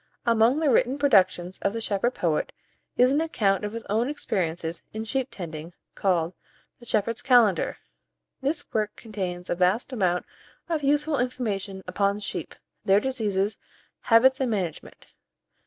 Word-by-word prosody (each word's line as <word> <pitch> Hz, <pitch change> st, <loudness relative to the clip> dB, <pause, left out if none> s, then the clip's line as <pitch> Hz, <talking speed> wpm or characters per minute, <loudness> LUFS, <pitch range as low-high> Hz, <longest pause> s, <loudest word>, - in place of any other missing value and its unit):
Among 230 Hz, +4 st, +4 dB
the 305 Hz, -4 st, +2 dB
written 250 Hz, +3 st, +3 dB
productions 190 Hz, -9 st, +3 dB
of 200 Hz, -, 0 dB
the 230 Hz, -, -3 dB
shepherd 225 Hz, +3 st, -1 dB
poet, 160 Hz, -4 st, 0 dB, 0.5 s
is 250 Hz, +1 st, +5 dB
an 290 Hz, +3 st, +2 dB
account 210 Hz, -12 st, +1 dB
of 210 Hz, -, -2 dB
his 230 Hz, 0 st, -5 dB
own 225 Hz, +5 st, 0 dB
experiences 170 Hz, -, -2 dB
in 220 Hz, 0 st, -4 dB
sheep 260 Hz, +3 st, -1 dB
tending, 165 Hz, -2 st, -7 dB, 0.2 s
called 175 Hz, -3 st, 0 dB, 0.5 s
"The 240 Hz, -, -14 dB
Shepherd's 220 Hz, +2 st, 0 dB
Calender." 230 Hz, -9 st, +3 dB, 0.6 s
This 285 Hz, +2 st, -1 dB
work 215 Hz, -1 st, -1 dB
contains 185 Hz, -5 st, -5 dB
a -, -, 0 dB
vast 185 Hz, +9 st, +1 dB
amount 180 Hz, -6 st, +1 dB, 0.4 s
of 325 Hz, -3 st, -1 dB
useful 295 Hz, +1 st, +1 dB
information 205 Hz, -6 st, -2 dB
upon 200 Hz, +2 st, 0 dB
sheep, 205 Hz, -, -5 dB, 0.3 s
their 195 Hz, +1 st, +5 dB
diseases, 210 Hz, -5 st, -1 dB, 0.4 s
habits, 260 Hz, +3 st, +5 dB
and 260 Hz, -, +1 dB
management. 185 Hz, -8 st, -4 dB
215 Hz, 145 wpm, -26 LUFS, 190-250 Hz, 0.6 s, is